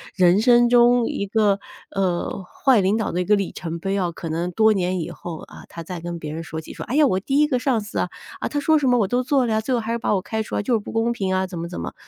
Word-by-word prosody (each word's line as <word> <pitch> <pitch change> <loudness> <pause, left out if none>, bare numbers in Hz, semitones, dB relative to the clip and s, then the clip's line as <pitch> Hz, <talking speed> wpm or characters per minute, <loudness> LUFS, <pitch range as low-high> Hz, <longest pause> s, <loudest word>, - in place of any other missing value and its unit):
人 180 +1 +4
生 240 0 +5
中 240 0 +5
一 200 - -2
个， 205 -1 +2 0.4
呃， 190 0 -1
坏 255 +5 +2
领 190 +3 +2
导 220 - -2
的 175 - -2
一 - - -2
个 210 - +4
里 200 -2 -2
程 170 -1 -6
碑 195 +3 -2
啊， 180 -3 0
可 170 0 -7
能 170 +3 -2
多 220 +4 +4
年 185 -2 -1
以 - - -5
后， 165 -2 -7
呃， - - -12
他 170 - -8
再 180 +1 -6
跟 170 0 -6
别 150 -2 -6
人 165 +1 -5
说 160 0 -6
起 - - -11
说， - - -7
哎 250 - -3
呀， 300 0 +5
我 185 -7 +1
第 270 +8 0
一 300 - +4
个 265 -4 +1
上 245 -4 +1
司 210 - -7
啊， - - -1 0.3
啊， - - -2
她 290 - -2
说 315 +2 +3
什 280 -3 +1
么 245 - +4
我 205 - +2
都 245 +5 0
做 265 0 +2
了 225 - 0
呀， 220 - +1
最 255 +4 -2
后 240 - +1
还 220 - -4
是 235 - 0
把 235 - 0
我 195 - +1
开 220 +3 -3
除 - - -6
了， - - 0
就 245 - 0
是 - - +1
不 205 - -9
公 225 +1 +1
平 195 -5 -2
啊， 190 0 0
怎 180 -2 -8
么 170 - -4
怎 170 - -7
么。 - - -5
205 Hz, 345 characters per minute, -22 LUFS, 180-240 Hz, 0.4 s, 生